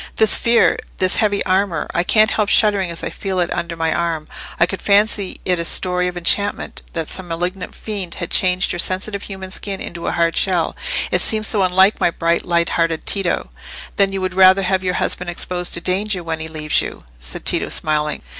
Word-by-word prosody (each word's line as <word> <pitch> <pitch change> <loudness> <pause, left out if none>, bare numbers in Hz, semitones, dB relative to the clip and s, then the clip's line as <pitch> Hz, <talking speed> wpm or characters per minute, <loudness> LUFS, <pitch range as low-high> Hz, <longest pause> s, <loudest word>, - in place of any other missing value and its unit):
"This 220 -1 +4
fear—this 230 -5 +2
heavy 205 -2 +1
armour. 185 -3 0
I 175 - +2
can't 215 +3 +4
help 210 -2 0
shuddering 205 -5 +3
as 170 - -4
I - - -3
feel 190 -2 -3
it 175 - 0
under 170 -1 -3
my 165 0 0
arm. 165 -3 -2 0.3
I 170 - +6
could 190 +2 -5
fancy 205 -1 +1
it 180 -2 +1
a - - -1
story 180 +1 +2
of 180 0 -5
enchantment—that 175 -3 -1
some 190 -2 -3
malignant 180 +3 -4
fiend 195 -5 -5
had 170 - -6
changed 180 0 +3
your 175 - -3
sensitive 195 +3 -2
human 190 -2 -8
skin 195 -1 -4
into 170 0 -6
a - - +1
hard 170 -1 +1
shell. 180 -4 +1 0.4
It - - +3
seems 215 -2 +2
so 210 -3 +2
unlike 190 +2 +4
my - - +3
bright, 170 0 0
light 170 -1 +1
hearted 165 -1 -1
Tito!" 190 - -1 0.5
"Then 195 -1 +3
you 195 0 -3
would 185 -1 -2
rather 190 +1 +6
have 190 0 0
your 180 0 -1
husband 180 -1 -1
exposed 180 +1 -3
to 170 - -3
danger, 190 +1 -1
when 165 -1 -4
he 160 - -4
leaves 155 -1 0
you?" - - -7 0.2
said - - -5
Tito, - - 0
smiling. 150 - -2
180 Hz, 200 wpm, -19 LUFS, 170-195 Hz, 0.5 s, I